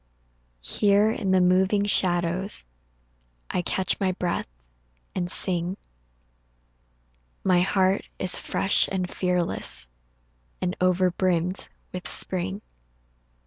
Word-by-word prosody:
Here 205 Hz, -, +3 dB
in 195 Hz, -, -3 dB
the 185 Hz, 0 st, +4 dB
moving 190 Hz, +3 st, +3 dB
shadows 180 Hz, -, 0 dB, 0.9 s
I -, -, 0 dB
catch 185 Hz, +1 st, 0 dB
my 190 Hz, -2 st, 0 dB
breath 180 Hz, -1 st, -2 dB, 0.7 s
and 175 Hz, -1 st, -3 dB
sing 180 Hz, 0 st, +2 dB, 1.7 s
My 185 Hz, -2 st, +3 dB
heart 190 Hz, +1 st, +1 dB
is 185 Hz, -, +4 dB
fresh 195 Hz, -, +1 dB
and 185 Hz, -2 st, -1 dB
fearless 175 Hz, -, 0 dB, 0.7 s
And 180 Hz, 0 st, -2 dB
over 185 Hz, 0 st, +2 dB
brimmed 180 Hz, 0 st, 0 dB, 0.2 s
with 180 Hz, 0 st, -5 dB
spring. 190 Hz, +2 st, -3 dB
185 Hz, 100 wpm, -25 LUFS, 180-190 Hz, 1.7 s, the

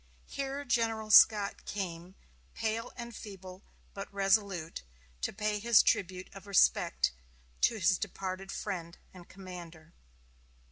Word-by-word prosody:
Here 275 Hz, +1 st, -4 dB
General 225 Hz, -3 st, 0 dB
Scott 210 Hz, -2 st, +6 dB
came, 180 Hz, -2 st, -5 dB, 0.4 s
pale 225 Hz, +2 st, -2 dB
and 235 Hz, -2 st, -8 dB
feeble, 190 Hz, -2 st, -10 dB, 0.3 s
but 195 Hz, 0 st, -7 dB
resolute, 195 Hz, -4 st, 0 dB, 0.4 s
to -, -, -1 dB
pay 210 Hz, +1 st, -2 dB
his 230 Hz, +1 st, +6 dB
tribute 185 Hz, -1 st, 0 dB
of 195 Hz, 0 st, -12 dB
respect 200 Hz, -2 st, +3 dB, 0.5 s
to -, -, +4 dB
his 190 Hz, -2 st, +2 dB
departed 195 Hz, 0 st, -5 dB
friend 175 Hz, -4 st, -5 dB, 0.2 s
and 180 Hz, -2 st, -14 dB
commander. 175 Hz, -4 st, -11 dB
195 Hz, 120 wpm, -31 LUFS, 185-220 Hz, 0.5 s, Scott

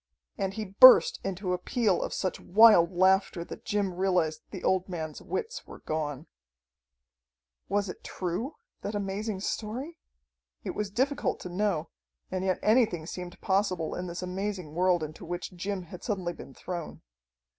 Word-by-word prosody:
And 195 Hz, 0 st, -2 dB
he 220 Hz, -1 st, -3 dB
burst 230 Hz, +7 st, +8 dB
into 190 Hz, -1 st, -2 dB
a 180 Hz, -, -1 dB
peal 220 Hz, -7 st, +1 dB
of -, -, -3 dB
such 185 Hz, -, -2 dB
wild 200 Hz, -3 st, +6 dB
laughter 185 Hz, -1 st, +2 dB
that -, -, -10 dB
Jim 205 Hz, -3 st, 0 dB
realized 180 Hz, -4 st, +1 dB
the 190 Hz, -, -8 dB
old 190 Hz, 0 st, +1 dB
man's 160 Hz, -4 st, -5 dB
wits 460 Hz, +5 st, -4 dB
were -, -, -10 dB
gone. 150 Hz, -2 st, -3 dB, 1.4 s
Was 200 Hz, +1 st, +1 dB
it 180 Hz, -, -8 dB
true, 195 Hz, -, -3 dB, 0.3 s
that 205 Hz, -, -4 dB
amazing 200 Hz, 0 st, -3 dB
story? 250 Hz, +12 st, -4 dB, 0.6 s
It -, -, -3 dB
was 210 Hz, -1 st, -3 dB
difficult 275 Hz, +7 st, 0 dB
to 180 Hz, -, -6 dB
know, 185 Hz, -3 st, -1 dB, 0.4 s
and 185 Hz, 0 st, -2 dB
yet 185 Hz, -2 st, +1 dB
anything 215 Hz, -8 st, +3 dB
seemed 180 Hz, +1 st, -7 dB
possible 190 Hz, -4 st, 0 dB
in 180 Hz, 0 st, -4 dB
this 175 Hz, +1 st, -5 dB
amazing 185 Hz, -3 st, -4 dB
world 175 Hz, -1 st, +2 dB
into 155 Hz, 0 st, -7 dB
which 175 Hz, +1 st, -5 dB
Jim 190 Hz, +1 st, -3 dB
had 175 Hz, +1 st, -11 dB
suddenly 185 Hz, -6 st, -2 dB
been 135 Hz, -, -12 dB
thrown. 175 Hz, -3 st, -6 dB
190 Hz, 155 wpm, -29 LUFS, 175-210 Hz, 1.4 s, burst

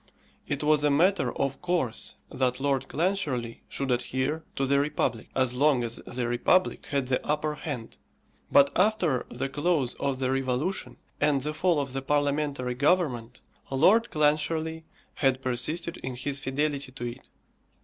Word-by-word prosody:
It 145 Hz, 0 st, -2 dB
was 150 Hz, -1 st, +4 dB
a 145 Hz, -, +4 dB
matter 175 Hz, +6 st, +3 dB
of 135 Hz, 0 st, -1 dB
course 170 Hz, -11 st, -1 dB, 0.2 s
that 125 Hz, -1 st, 0 dB
Lord 135 Hz, -1 st, 0 dB
Clancharlie 145 Hz, -9 st, -1 dB
should 135 Hz, -2 st, -2 dB
adhere 130 Hz, +5 st, -1 dB
to 135 Hz, -, 0 dB
the 140 Hz, +1 st, +3 dB
republic, 140 Hz, -5 st, -1 dB
as 130 Hz, -2 st, +2 dB
long 135 Hz, -1 st, +3 dB
as 115 Hz, 0 st, -2 dB
the 120 Hz, -1 st, -2 dB
republic 150 Hz, +10 st, +2 dB
had 140 Hz, -2 st, 0 dB
the 125 Hz, 0 st, 0 dB
upper 150 Hz, 0 st, 0 dB
hand; 140 Hz, -6 st, -6 dB, 0.5 s
but 140 Hz, 0 st, +6 dB
after 185 Hz, -, +2 dB
the 130 Hz, +3 st, -3 dB
close 145 Hz, -2 st, 0 dB
of 135 Hz, -2 st, 0 dB
the 130 Hz, 0 st, 0 dB
revolution 130 Hz, 0 st, -1 dB, 0.2 s
and 145 Hz, -2 st, +2 dB
the 150 Hz, +3 st, -3 dB
fall 170 Hz, 0 st, +2 dB
of 135 Hz, -2 st, -3 dB
the 135 Hz, -, -2 dB
parliamentary 145 Hz, -2 st, 0 dB
government, 130 Hz, -5 st, +1 dB, 0.3 s
Lord 195 Hz, -, +4 dB
Clancharlie 160 Hz, +2 st, 0 dB, 0.3 s
had 135 Hz, -2 st, +1 dB
persisted 155 Hz, +7 st, -1 dB
in 130 Hz, -1 st, -5 dB
his 140 Hz, +3 st, -2 dB
fidelity 140 Hz, 0 st, -1 dB
to 120 Hz, -2 st, -6 dB
it. 120 Hz, 0 st, -7 dB
140 Hz, 155 wpm, -27 LUFS, 130-155 Hz, 0.5 s, but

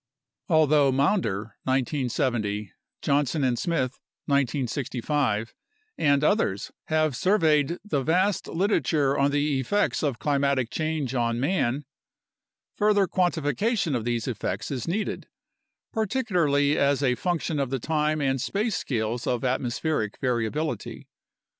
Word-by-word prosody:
Al 160 Hz, -2 st, +5 dB
though 145 Hz, -2 st, +4 dB
Maunder 115 Hz, -, 0 dB
(1970), 120 Hz, -6 st, -1 dB, 0.3 s
Johnson 140 Hz, 0 st, +1 dB
and 125 Hz, -2 st, +1 dB
Smith 150 Hz, -7 st, -1 dB, 0.3 s
(1965), 130 Hz, -3 st, 0 dB, 0.4 s
and 140 Hz, -1 st, +2 dB
others 150 Hz, -, +1 dB
have 155 Hz, -3 st, +1 dB
surveyed 160 Hz, -2 st, +2 dB
the 145 Hz, -9 st, 0 dB
vast 180 Hz, +7 st, +1 dB
literature 160 Hz, -7 st, +1 dB
on 140 Hz, 0 st, +3 dB
the 145 Hz, -1 st, +1 dB
effects 205 Hz, +11 st, 0 dB
of 140 Hz, -6 st, 0 dB
climatic 140 Hz, -3 st, 0 dB
change 155 Hz, -5 st, -2 dB
on 120 Hz, -2 st, 0 dB
man, 140 Hz, -2 st, 0 dB, 0.9 s
further 205 Hz, -2 st, +3 dB
quantification 175 Hz, -, 0 dB
of 120 Hz, -, -1 dB
these 120 Hz, 0 st, -1 dB
effects 110 Hz, -2 st, -3 dB
is 125 Hz, -4 st, -3 dB
needed, 205 Hz, +6 st, -2 dB, 0.7 s
particularly 175 Hz, -, +1 dB
as 140 Hz, 0 st, +2 dB
a 125 Hz, -2 st, +3 dB
func 175 Hz, +3 st, -1 dB
tion 155 Hz, -3 st, -2 dB
of 135 Hz, -3 st, 0 dB
the 135 Hz, -, -1 dB
time 155 Hz, +3 st, 0 dB
and 135 Hz, -2 st, 0 dB
space 205 Hz, -, -1 dB
scales 115 Hz, -1 st, -2 dB
of 125 Hz, 0 st, 0 dB
atmospheric 125 Hz, -2 st, -1 dB
variability. 125 Hz, 0 st, -2 dB
140 Hz, 120 wpm, -26 LUFS, 125-160 Hz, 0.9 s, Al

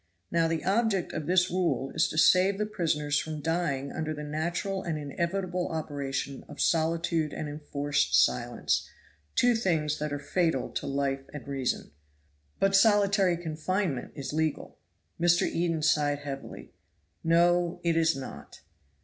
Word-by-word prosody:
Now 165 Hz, -1 st, +3 dB
the 165 Hz, -1 st, -2 dB
object 200 Hz, -2 st, +1 dB
of 155 Hz, -2 st, -4 dB
this 180 Hz, 0 st, +3 dB
rule 165 Hz, -8 st, 0 dB
is -, -, +3 dB
to 155 Hz, -, -6 dB
save 185 Hz, +4 st, +5 dB
the 210 Hz, -, 0 dB
prisoners 150 Hz, -8 st, 0 dB
from 155 Hz, -1 st, -4 dB
dying 150 Hz, -4 st, -1 dB
under 155 Hz, 0 st, -3 dB
the 150 Hz, -, -6 dB
natural 170 Hz, +6 st, -2 dB
and 165 Hz, -4 st, -3 dB
inevitable 175 Hz, +5 st, -2 dB
operation 140 Hz, -3 st, -4 dB
of 145 Hz, -, -10 dB
solitude 165 Hz, -1 st, +1 dB
and 155 Hz, -, -4 dB
enforced 145 Hz, -, -1 dB
silence, 65 Hz, -5 st, +1 dB, 0.5 s
two 245 Hz, 0 st, +4 dB
things 160 Hz, -9 st, 0 dB
that 150 Hz, 0 st, -2 dB
are 145 Hz, -, -1 dB
fatal 160 Hz, -1 st, 0 dB
to -, -, -4 dB
life 135 Hz, -1 st, -1 dB
and 145 Hz, -, -8 dB
reason." 135 Hz, -, -2 dB, 0.7 s
"But 195 Hz, 0 st, +3 dB
solitary 200 Hz, -3 st, +4 dB
confinement 165 Hz, -2 st, -2 dB
is 140 Hz, -1 st, -5 dB
legal." 155 Hz, -1 st, -2 dB, 0.4 s
Mr. 175 Hz, 0 st, +4 dB
Eden 165 Hz, -2 st, -1 dB
sighed 145 Hz, -2 st, +2 dB
heavily. 135 Hz, -1 st, -7 dB, 0.5 s
"No 175 Hz, +1 st, +3 dB
it 170 Hz, -1 st, +2 dB
is 165 Hz, -1 st, +3 dB
not. 135 Hz, -1 st, -9 dB
160 Hz, 145 wpm, -28 LUFS, 145-175 Hz, 0.7 s, save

